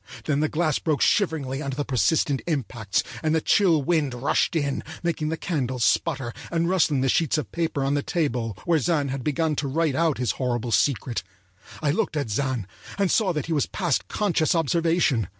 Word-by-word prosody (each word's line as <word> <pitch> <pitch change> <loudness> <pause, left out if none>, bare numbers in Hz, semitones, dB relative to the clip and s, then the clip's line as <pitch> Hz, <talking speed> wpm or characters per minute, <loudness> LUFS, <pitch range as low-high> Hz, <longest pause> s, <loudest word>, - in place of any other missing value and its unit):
Then 145 -2 +1
the 155 0 +1
glass 155 -2 0
broke 155 -3 0
shiveringly 150 -8 +1
under 140 -3 -3
the 145 0 -2
persistent 140 +2 +1
impacts, 120 - -1 0.2
and 155 0 +1
the - - +3
chill 165 -3 +3
wind 145 -4 +1
rushed 130 +7 +1
in, 145 -3 0 0.2
making 160 -3 -1
the 160 - -2
candles 130 -9 -1
sputter 135 -8 0 0.2
and 170 -1 +1
rustling 165 -7 +2
the 135 - +1
sheets 155 +3 +2
of 130 -10 -4
paper 160 -4 -1
on 135 +1 +1
the 145 - +1
table 125 - -2
where 170 -2 +3
Zann 150 -2 0
had 130 -1 -4
begun 155 +2 0
to 140 - -1
write 155 +1 +1
out 160 +1 +1
his 125 -6 0
horrible 120 -2 -1
secret. 125 -3 +1 0.6
I 145 - +3
looked 165 -2 -1
at 140 -7 -2
Zann, 130 -2 -1 0.3
and 195 -3 +1
saw 210 -5 +3
that 150 -3 -2
he 165 - -2
was 145 - +1
past 175 -9 -1
conscious 180 -6 +1
observation. 165 - +2
150 Hz, 195 wpm, -25 LUFS, 130-165 Hz, 0.6 s, the